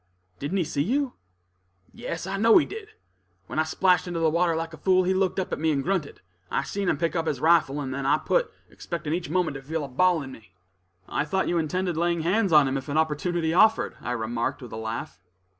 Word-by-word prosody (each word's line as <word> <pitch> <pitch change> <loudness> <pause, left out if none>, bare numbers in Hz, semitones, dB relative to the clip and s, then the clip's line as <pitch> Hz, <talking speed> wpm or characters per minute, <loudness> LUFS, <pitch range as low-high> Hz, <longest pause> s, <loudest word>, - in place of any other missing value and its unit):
"Didn't 145 +8 -2
he 180 - +2
see 145 -2 -2
you?" 260 - 0 0.8
"Yes, 170 - -5
I 190 +1 -3
know 225 +2 +6
he 330 - +4
did. 415 0 -8 0.6
When - - -4
I - - +4
splashed 180 +3 +2
into 175 -1 -3
the 160 -1 +2
water 170 0 +2
like 165 0 -4
a - - -9
fool, 185 -1 +3
he 185 +1 +1
looked 190 0 0
up 190 0 -3
at - - -2
me 160 0 +2
and 140 -2 0
grunted; 175 -5 -2 0.3
I - - 0
seen 195 +4 -2
him 150 - +1
pick 165 +2 -1
up 165 -1 -1
his 140 - -1
rifle, 155 -2 +3
and 135 -2 -4
then 135 0 -3
I 150 - +4
put, 485 - 0 0.2
expecting 165 -3 -5
each 170 -2 -3
moment 175 -2 0
to - - -10
feel 155 +3 -3
a - - -4
ball 165 +4 +2
in 135 - -8
me." 110 -7 -15 0.5
"I - - -1
thought 190 +6 -1
you 175 - +1
intended 175 +2 -1
laying 170 0 +1
hands 190 +4 +1
on 150 -3 +6
him 135 +1 -1
if 135 +2 -7
an 145 - -1
opportunity 160 +1 0
offered," 220 +5 +4
I 120 - -3
remarked, 115 0 -2
with 120 - -10
a - - -6
laugh. 110 -4 -5
165 Hz, 240 wpm, -26 LUFS, 145-185 Hz, 0.8 s, know